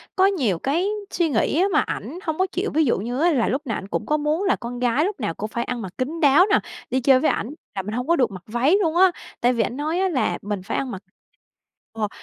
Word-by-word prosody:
có 380 0 +4
nhiều 255 - +1
cái 335 +8 0 0.2
suy 335 -3 +1
nghĩ 280 +5 +1
á - - +4
mà - - +5
ảnh 350 - -5
hông 315 -1 -2
có 375 - +2
chịu. 385 +4 -2
Ví 315 0 +3
dụ 235 - +2
như 245 +5 -3
á 345 +2 +4
là 250 -6 +2
lúc 270 +4 0
nào 225 - -1
ảnh 195 - -7
cũng - - -3
có 300 - +1
muốn 305 +5 0
là 390 - +3
con 245 0 -7
gái 250 +6 +2
lúc 400 -6 -3
nào 205 -8 -2
cũng 215 +4 -5
phải 235 +1 -2
ăn 245 -2 -4
mặc 190 -4 -6
kín 300 +6 -3
đáo 295 +6 +6
nè, - - +5 0.3
đi 260 +2 +1
chơi 265 0 +5
với 310 - +2
ảnh 225 - -3 0.3
là 190 - -1
mình 210 +3 -6
hông 250 +3 -3
có 340 - +4
được 250 -7 +2
mặc 185 -2 -9
váy 250 - +2
luôn 325 -2 0
á. 370 0 +6 0.3
Tại 245 +1 +3
vì 230 -2 +1
ảnh 250 - -4
nói 315 +5 -1
á 380 0 +2
là 255 - 0
mình 205 -2 -3
phải - - -3
ăn 265 -3 -2
mặc 190 - -6 0.9
ờ, 215 -2 -2
265 Hz, 285 wpm, -23 LUFS, 230-330 Hz, 0.9 s, đáo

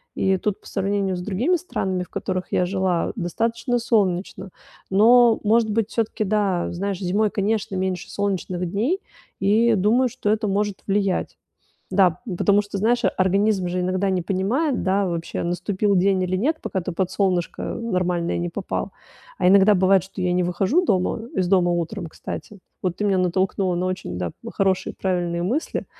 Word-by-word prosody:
И 190 0 +2
тут 205 +1 -2
по - - -15
сравнению 195 -1 -1
с 180 - -5
другими 215 - 0
странами, 190 - -2
в - - -14
которых 185 -1 -3
я 180 - +2
жила, 190 -2 0
достаточно 230 +6 -1
солнечно. 195 -4 0 0.4
Но, 230 +3 +6
может 220 +1 +3
быть, 220 0 0
всё-таки 225 -2 -1
да, 200 -4 0
знаешь, 195 +1 -3
зимой, 200 +3 +1
конечно, 210 0 -1
меньше 185 0 -2
солнечных 185 -3 -2
дней 245 - 0 0.4
и 220 +4 +3
думаю, 225 +6 +3
что 245 -3 -3
это 215 0 +1
может 205 0 -1
влиять. 195 -2 0 0.5
Да, 185 -3 +3
ну 195 - -3
потому 205 +3 +3
что, 205 -1 -5
знаешь, 235 +4 +2
организм 190 0 +2
же 180 - -2
иногда 185 +2 0
не 185 -1 0
понимает, 220 - 0
да, 195 +1 +1
вообще 170 -1 -3
наступил 185 +4 0
день 190 +1 +3
или 185 0 -1
нет, 290 - +1
пока 190 - -3
ты 180 - -4
под 185 +1 -2
солнышко 185 -3 0
нормальное 180 -6 -1
не 175 0 -2
попал. 190 +2 -4 0.5
А 180 - +2
иногда 200 +2 +6
бывает, 190 0 +4
что 190 +2 -9
я 180 -1 +1
не 180 0 +2
выхожу 190 - +1
дома 190 - +1 0.2
из 185 -1 +1
дома 180 -1 +3
утром, 175 +2 -2
кстати. 205 +5 -8 0.2
Вот 180 -2 -1
ты 210 - -2
меня 195 -2 +2
натолкнула 185 0 0
на 180 +1 -1
очень, 185 - -4
да, 90 -2 -2
п - - -7
хорошие, 190 -1 0
правильные 175 -2 -1
мысли, 255 - -2
195 Hz, 175 wpm, -23 LUFS, 180-210 Hz, 0.5 s, Но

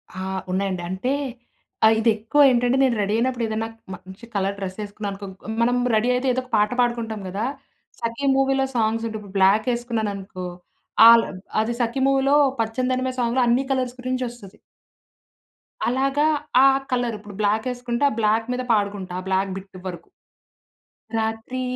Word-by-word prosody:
ఆ! - - -6 0.3
ఉన్నాయండి 185 -1 -1
అంటే 190 +8 -2 0.7
ఆహ్, 220 0 +6
ఇది 225 +1 +3
ఎక్కువేంటంటే 245 +1 +3
నేను 255 -3 +3
రెడీ 205 +1 0
అయినప్పుడు 250 0 0
ఏదైనా 220 +1 -2 0.3
మంచి 190 +5 -13
కలర్ 195 0 0
డ్రెస్ 185 -1 -5
ఏసుకున్నాననుకో 205 -1 -6 0.4
మనం 245 +1 +3 0.2
రెడీ 230 +3 +2
అయితే 250 +2 0
ఏదో 255 - -1
ఒక 255 - -19
పాట 210 0 +3
పాడుకుంటాం 235 -3 0
గదా. 205 +5 -2 0.5
'సఖి' 230 +5 -2
మూవీ‌లో 270 0 +2
సాంగ్స్ 225 0 +1
ఉంటాయి 220 -1 -5
ఇప్పుడు 200 -1 -13
బ్లాక్ 200 +5 +4
వేసుకున్నాను 235 -3 -2
అనుకో 185 -2 -7 0.6
అల్ 230 0 +8 0.4
అది 230 +2 -1
'సఖి' 240 +3 0
మూవీలో 275 +1 +3 0.3
పచ్చనిదనిమె 255 +3 -1
సాంగ్‌లో 240 +1 +1
అన్ని 240 +3 +3
కలర్స్ 255 -2 -1
గురించి 255 0 -2
వస్తది. 210 -6 -13 1.3
అలాగా 270 +4 +1 0.4
ఆ - - +8 0.2
కలర్ 245 -3 0
ఇప్పుడు 205 -1 -12
బ్లాక్ 215 +3 +1
వేసుకుంటే 245 +1 -3
ఆ - - -5
బ్లాక్ 220 +1 +2
మీద 250 - -2
పాడుకుంటా 200 -3 -1
ఆ 185 - -7
బ్లాక్ 190 0 0
బిట్ 190 -1 -11
వరకు. 175 -2 -7 1.1
రాత్రి 225 +3 -3
230 Hz, 150 wpm, -23 LUFS, 205-250 Hz, 1.3 s, అల్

